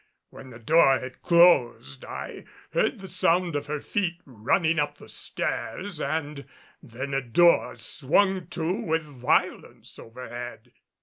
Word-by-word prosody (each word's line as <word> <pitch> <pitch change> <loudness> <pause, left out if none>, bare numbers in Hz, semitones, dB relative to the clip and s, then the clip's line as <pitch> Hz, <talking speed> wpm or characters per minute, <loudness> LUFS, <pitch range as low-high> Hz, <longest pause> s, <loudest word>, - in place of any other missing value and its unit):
When 130 - -12
the 115 - -11
door 135 +2 +4
had 130 0 -9
closed, 125 - +3
I - - -7 0.3
heard - - 0
the 190 - -8
sound 175 -2 +1
of 145 0 -3
her 150 0 -3
feet 175 +1 -2
running 155 - 0
up 145 0 -1
the - - -14
stairs 185 -5 -4
and 145 -1 -3 0.3
then 130 +4 -7
a 135 - +1
door 170 +8 +3
swung 185 +5 +1
to 170 0 -2
with 160 -4 -1
violence 135 -5 -2
overhead. 120 0 -9
145 Hz, 135 wpm, -26 LUFS, 125-170 Hz, 0.3 s, door